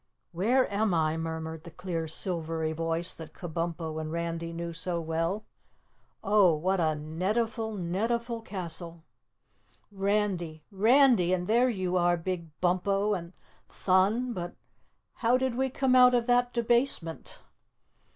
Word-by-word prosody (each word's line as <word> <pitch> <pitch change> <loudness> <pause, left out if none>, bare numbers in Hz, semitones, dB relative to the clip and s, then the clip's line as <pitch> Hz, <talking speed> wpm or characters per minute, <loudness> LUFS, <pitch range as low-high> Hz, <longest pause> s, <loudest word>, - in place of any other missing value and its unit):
"Where 230 +10 +2
am 205 -2 +1
I?" 155 -1 +1
murmured 160 -1 -5
the 170 - -9
clear 170 -1 -4
silvery 160 -1 -1
voice 165 +2 -1
that 160 -1 -11
Kabumpo 165 -2 -4
and 155 0 -5
Randy 165 0 -3
knew 170 0 -5
so 170 +1 -2
well. 165 +6 -2 0.8
"Oh, 200 -5 +4
what 185 +5 0
a 160 -2 +2
netiful, 215 +8 -2
netiful 230 +6 -2
castle. 170 -4 -5 0.9
Randy! 195 -5 -1
Randy! 220 -2 +4
And 180 -1 -1
there 240 +5 +3
you 185 -5 -1
are, 175 0 +3
Big 170 0 -4
Bumpo, 195 +3 +1
and 170 -1 -7 0.4
Thun! 205 +7 +1
But 175 -3 -5 0.6
how 245 +2 +3
did 260 -1 -1
we 265 +2 0
come 260 0 +1
out 250 0 +7
of 240 -1 +1
that 245 0 +2
debasement?" 235 -8 0
180 Hz, 130 wpm, -29 LUFS, 165-220 Hz, 0.9 s, out